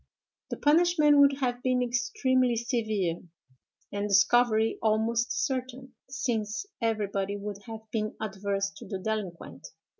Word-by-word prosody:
The - - -4
punishment 305 -1 +4
would 280 0 +6
have 245 -1 -1
been 255 -1 +1
extremely 250 +1 +1
severe, 215 -7 -1 0.7
and 205 0 -2
discovery 220 +3 +3
almost 225 +2 +1
certain, 260 0 -3 0.2
since 225 - -2 0.2
everybody 205 -3 -1
would 205 0 -6
have 225 -1 -7
been 215 -1 -2
adverse 200 -1 -2
to - - -10
the 195 - -4
delinquent. 195 -3 -5
225 Hz, 120 wpm, -28 LUFS, 205-255 Hz, 0.7 s, would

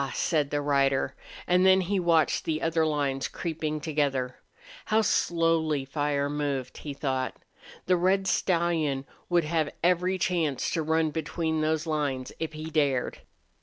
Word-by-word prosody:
said 150 -4 +1
the 145 0 -1
rider, 140 -2 +1 0.3
and 180 +1 +3
then 190 0 +6
he 190 +2 0
watched 165 -3 +2
the 155 -1 -1
other 160 0 +1
lines 140 -3 -1
creeping 155 -2 -3
together. 140 -4 -1 0.5
How 220 0 +2
slowly 165 -6 +1
fire 145 0 -1
moved, 145 -3 -3
he 150 - -6
thought. 135 -2 -2 0.5
The 180 0 +3
red 190 +2 +2
stallion 165 -7 +1 0.2
would 175 -1 +3
have 155 -1 0
every 180 +1 +2
chance 170 -7 0
to 165 - 0
run 160 0 +1
between 160 0 -2
those 155 +1 0
lines, 145 -5 -2
if 160 -1 -3
he 155 +1 -6
dared. 140 -5 0
155 Hz, 145 wpm, -27 LUFS, 145-170 Hz, 0.5 s, then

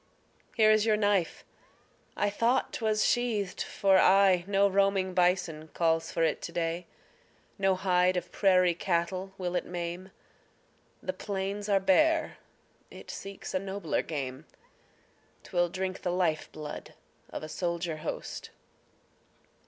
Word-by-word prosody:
Here 215 -1 +6
is 215 -1 +4
your 215 -1 +3
knife! 205 -5 0 0.7
I 205 - +1
thought 230 +5 +1
'twas 215 -2 +1
sheathed 215 -6 0
for 195 -2 +3
aye. 190 -2 +5
No 200 0 +3
roaming 195 -1 +1
bison 180 -3 +1
calls 165 -1 +1
for 165 - 0
it 160 - +1
to - - -6
day; 170 0 -2 0.7
No 195 -1 +3
hide 180 -1 +2
of 180 - -4
prairie 185 -3 +4
cattle 180 +2 -1
will 180 -1 -3
it - - 0
maim; 175 +1 -5 0.9
The 185 - -2
plains 200 +1 -4
are 200 -1 +4
bare, 310 - +2 0.5
it - - -10
seeks 195 0 -8
a 185 - +1
nobler 195 -3 -2
game: 140 -2 -5 1.0
'Twill 175 -1 0
drink 185 +1 -4
the - - -2
life 175 -4 0
blood 150 -1 -8 0.3
of - - -6
a - - -5
soldier 170 -1 -3
host. 155 +1 -6
185 Hz, 135 wpm, -29 LUFS, 170-200 Hz, 1.0 s, Here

